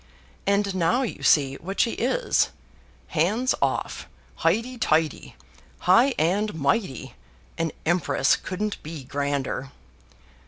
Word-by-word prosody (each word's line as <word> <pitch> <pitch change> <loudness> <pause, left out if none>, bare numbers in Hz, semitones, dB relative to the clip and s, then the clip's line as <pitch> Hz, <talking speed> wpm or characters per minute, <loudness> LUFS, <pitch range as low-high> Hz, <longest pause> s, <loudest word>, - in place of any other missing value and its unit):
And 200 0 +2
now 185 +8 +2
you 240 - -5
see 135 -3 +3
what 195 +4 -6
she 230 - +3
is 370 - +1 0.6
hands 210 +11 +1
off, - - -1 0.3
highty 230 +9 0
tighty, 155 - 0 0.5
high 235 +9 +5
and 195 +5 +1
mighty, 140 - -1 0.5
an 165 -1 0
empress 175 +2 +2
couldn't 205 +3 -4
be 155 -2 -7
grander. 140 -1 -2
180 Hz, 110 wpm, -25 LUFS, 155-215 Hz, 0.6 s, high